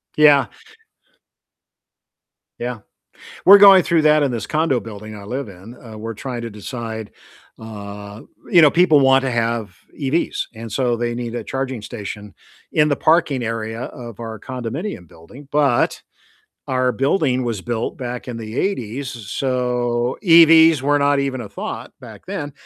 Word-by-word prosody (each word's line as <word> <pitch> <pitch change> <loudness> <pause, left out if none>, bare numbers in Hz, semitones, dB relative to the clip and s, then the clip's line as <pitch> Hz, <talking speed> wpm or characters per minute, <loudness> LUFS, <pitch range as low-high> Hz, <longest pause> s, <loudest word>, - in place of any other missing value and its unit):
Yeah. 145 -4 +5 2.1
Yeah. 120 -1 -4 0.7
We're 200 +2 +10
going 195 -2 +8
through 170 -2 +2
that 150 -1 +4
in 140 - 0
this 115 -4 -4
condo 155 -5 +1
building 110 -1 -9
I 100 - -10
live 125 +5 -5
in, 100 +6 -13
uh, 110 -2 -10
we're 115 +1 -6
trying 120 +2 -6
to 115 - -5
decide, 110 0 -7 0.5
uh 105 -1 -9 0.3
you 170 -2 +6
know, 150 - +6
people 165 -3 +4
want 135 0 +4
to 135 - -1
have 115 -5 -2 0.2
EVs, 145 +4 -1
and 115 0 -8
so 120 +1 0
they 120 0 -2
need 120 -1 -5
a - - -4
charging 130 -4 -4
station 105 -2 -8 0.4
in 150 0 +3
the 145 - +2
parking 155 -6 +2
area 115 0 -4
of 120 -3 -9
our 110 -2 -7
condominium 130 - -6
building, 120 - -15
but 145 -5 +1 0.7
our 130 -1 +1
building 135 -1 0
was 115 -5 -3
built 115 +2 -3
back 125 -2 -6
in 125 - -5
the 110 0 -5
'80s, 135 - -3
so 125 +1 -2
EVs 165 -3 +7
were 145 +2 +2
not 140 0 +2
even 135 -2 -2
a 110 - -7
thought - - -7
back - - -13
then. 145 0 -5
125 Hz, 155 wpm, -20 LUFS, 115-140 Hz, 2.1 s, We're